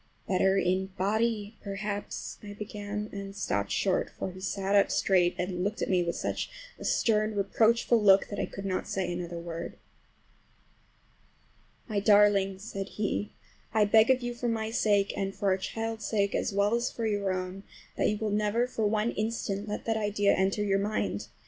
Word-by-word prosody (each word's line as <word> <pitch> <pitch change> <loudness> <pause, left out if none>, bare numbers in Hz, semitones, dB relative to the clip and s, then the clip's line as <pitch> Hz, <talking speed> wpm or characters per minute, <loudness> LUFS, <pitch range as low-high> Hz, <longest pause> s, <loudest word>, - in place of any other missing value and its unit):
"Better 190 +1 +3
in 190 0 +1
body 215 +2 0
perhaps"—I 205 0 -5
began, 210 0 -5
and 195 -1 -7
stopped 100 - -1
short, 190 -2 +1
for 190 - -5
he 185 +1 -11
sat 195 +1 -2
up 200 -1 +5
straight 180 -2 +3
and 180 0 -2
looked 205 +2 -1
at - - -1
me 180 -1 +3
with 170 -1 -1
such - - -2 0.3
a - - -8
stern, 215 -1 +2
reproachful 225 +3 +3
look 195 -1 +6
that 205 - -4
I - - -1
could 195 - -8
not 185 -1 -2
say 185 -2 -2
another 175 -1 -5
word. 170 0 -6 2.1
"My 215 -4 0
darling," 200 -2 +4
said 195 -1 -5
he, 210 0 -1 0.4
"I 215 -1 +5
beg 220 +3 +5
of 260 -1 +3
you, 240 0 -2
for 240 0 -3
my 220 -1 -1
sake 205 -3 +2
and 195 0 -2
for 200 - 0
our 190 - +3
child's 225 +2 -4
sake, 200 -2 +1
as - - 0
well 200 +2 +2
as 235 +1 +1
for 230 - -3
your 205 -3 0
own, 185 +1 -4 0.3
that - - +1
you 210 - -1
will 215 0 -2
never 210 +3 +1
for 225 -4 -1
one 215 +2 +1
instant 215 -2 -2
let 210 - -4
that 225 -1 +1
idea 205 -1 +2
enter 190 +2 +1
your 195 -1 +2
mind! 210 +2 -2
205 Hz, 180 wpm, -29 LUFS, 195-215 Hz, 2.1 s, look